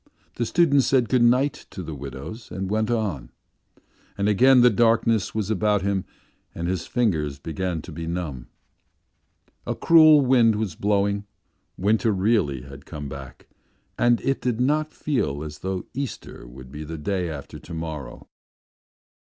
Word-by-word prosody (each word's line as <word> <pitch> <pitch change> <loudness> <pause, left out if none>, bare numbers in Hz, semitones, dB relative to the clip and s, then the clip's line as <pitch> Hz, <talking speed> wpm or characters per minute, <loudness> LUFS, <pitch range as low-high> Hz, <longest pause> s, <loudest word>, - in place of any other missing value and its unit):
The 120 - -1
student 155 -5 +4
said 130 -2 +2
good 130 -2 +3
night 125 +4 +2
to 95 - -7
the 80 - -6
widows 70 - -8
and 95 0 -4
went 110 0 0
on. 105 - -2 0.9
And 100 0 0
again 125 +5 +5
the 125 0 +6
darkness 115 -2 +2
was 110 -1 -1
about 105 -1 +1
him 100 -1 -1 0.5
and 85 +1 -3
his 90 -2 -2
fingers 80 - 0
began 85 +2 -4
to 90 - -10
be 80 +1 -6
numb. 80 -8 -4 1.2
A - - -1
cruel 155 -3 +7
wind 125 -4 +4
was 105 -4 -2
blowing, 100 +1 0 0.5
winter 110 +4 +2
really 95 - +1
had 70 +1 -12
come 75 -3 -6
back 65 -2 -10 0.5
and 120 0 +3
it 135 0 -1
did 125 -2 -1
not 150 +4 +1
feel 120 - -2
as 75 -1 -8
though 95 -1 -3
Easter 130 - -6
would 65 +1 -12
be 75 +2 -7
the 80 +2 -6
day 90 +3 -2
after 75 -4 -8
to 85 - -11
morrow. 80 -3 -6
100 Hz, 155 wpm, -24 LUFS, 80-120 Hz, 1.2 s, cruel